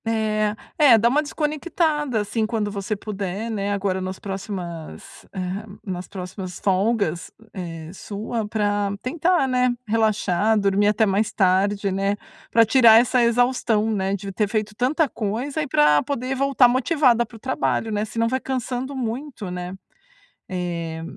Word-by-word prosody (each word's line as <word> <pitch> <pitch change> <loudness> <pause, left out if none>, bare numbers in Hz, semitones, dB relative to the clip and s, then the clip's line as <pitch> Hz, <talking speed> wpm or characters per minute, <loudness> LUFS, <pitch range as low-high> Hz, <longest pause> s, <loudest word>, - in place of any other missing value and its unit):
É. 215 -1 0 0.2
É, 275 -7 +7
dá 230 +2 +3
uma 290 +5 +3
desconectada, 300 -4 -1
assim, 215 +2 -1
quando 215 -2 -2
você 200 +1 -3
puder, 205 +1 -4
né, 205 -2 -2
agora 195 -2 -1
nas 185 0 -4
próximas, 190 -5 -7
hã, 190 +1 -4 0.2
nas 185 -2 -5
próximas 185 -1 -7
folgas, 195 -3 0 0.2
eh, 165 -3 -7
sua, 215 +3 -4
pra 205 -1 0
tentar, 335 +2 +1
né, 250 -1 +2 0.2
relaxar, 215 -1 +2
dormir 200 0 +2
até 215 +1 +3
mais 205 +2 +1
tarde, 195 +1 +2
né, 195 +2 0 0.3
pra 230 0 +5
tirar 225 -1 +7
essa 250 +1 +2
exaustão, 235 -2 +2
né, 195 -2 0
de 200 0 -6
ter 210 +2 0
feito 215 -1 -2
tanta 280 +7 +1
coisa 245 +7 -3
e 295 - -2
pra 150 - +4
poder 260 -2 -3
voltar 275 -1 +4
motivada 255 -1 +3
para 235 - -13
o - - -11
trabalho, 225 -2 -1
né, 210 0 0
senão 230 +1 -1
vai 260 +3 0
cansando 260 +1 -3
muito, 245 -4 -4
né. 180 +1 -5 0.7
Eh 170 -3 -4
215 Hz, 150 wpm, -23 LUFS, 195-245 Hz, 0.7 s, É